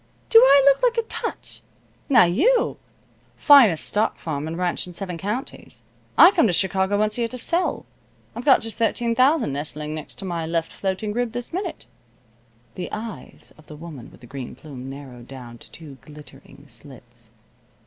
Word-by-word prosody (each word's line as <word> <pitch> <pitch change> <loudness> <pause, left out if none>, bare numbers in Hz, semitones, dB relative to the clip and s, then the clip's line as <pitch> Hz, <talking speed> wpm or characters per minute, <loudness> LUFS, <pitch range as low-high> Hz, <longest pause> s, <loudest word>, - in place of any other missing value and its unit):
Do 455 - +9
I 285 - +6
look 280 -1 +5
like - - +2
a 460 -1 -1
touch? 460 - -6 0.5
Now 250 -5 +7
you 330 - +2 0.3
" - - -36 0.2
"Finest 230 - +7
stock 210 +1 0
farm 150 -2 -4
and 165 +1 -5
ranch 180 0 -1
in 180 - -10
seven 180 0 -5
counties. 210 - -6 0.3
I 355 - +9
come 235 - +3
to 180 - 0
Chicago 190 +2 +1
once 215 +2 0
a - - 0
year 230 - +1
to 255 - -7
sell. 340 +8 -1 0.5
I've 235 - -6
got 270 -1 +5
just 225 -1 -4
thirteen 230 +1 +1
thousand 255 - +2
nestling 150 +1 -5
next 155 -1 -8
to 195 - -7
my 170 -3 -3
left 165 0 -2
floating 195 +2 -3
rib 240 0 -2
this 245 +4 -5
minute." 365 -1 -5 0.9
The 180 - -6
eyes 215 0 -8
of 155 - -19
the 150 - -10
woman 150 -6 -10
with - - -19
the - - -13
green 130 +1 -8
plume 135 -4 -10
narrowed 130 -3 -10
down 120 -3 -11
to - - -15
two 145 -5 -12
glittering 145 -2 -14
slits. 120 -2 -10
185 Hz, 185 wpm, -23 LUFS, 145-240 Hz, 0.9 s, Do